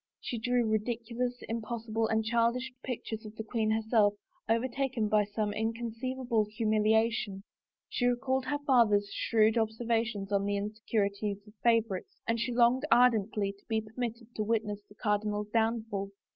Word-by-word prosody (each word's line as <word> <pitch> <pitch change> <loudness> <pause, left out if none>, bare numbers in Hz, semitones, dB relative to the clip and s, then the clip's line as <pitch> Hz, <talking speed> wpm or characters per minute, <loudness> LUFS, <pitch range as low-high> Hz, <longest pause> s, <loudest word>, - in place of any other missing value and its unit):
She 240 - -4
drew 245 0 +1
ridiculous, 235 +3 -2
impossible, 225 -1 -2
and 220 0 +1
childish 235 +3 +1
pictures 225 -3 -4
of 215 0 -10
the 220 - -5
queen 220 -1 -1
herself 220 -1 +3 0.3
overtaken 250 0 0
by 210 -1 +4
some 210 0 -2
inconceivable 230 +1 -1
humil 215 0 +1
iation; 220 -3 +1 0.4
she 245 - 0
recalled 260 +2 0
her 290 +2 0
father's 210 -7 +4
shrewd 220 0 +3
observations 225 -2 -1
on 200 0 +2
the 205 0 0
insecurities 205 -1 -2
of 210 - -15
favorites 230 -5 +1
and 230 0 +1
.she 240 +2 -1
longed 240 +2 +4
ardently 220 -4 +4
to 200 0 -22
be 220 -1 +2
permitted 230 +1 -5
to 215 - -2
witness 210 -2 -1
the 205 - -16
cardinal's 210 0 -1
downfall. 220 -3 0
225 Hz, 145 wpm, -31 LUFS, 210-235 Hz, 0.4 s, by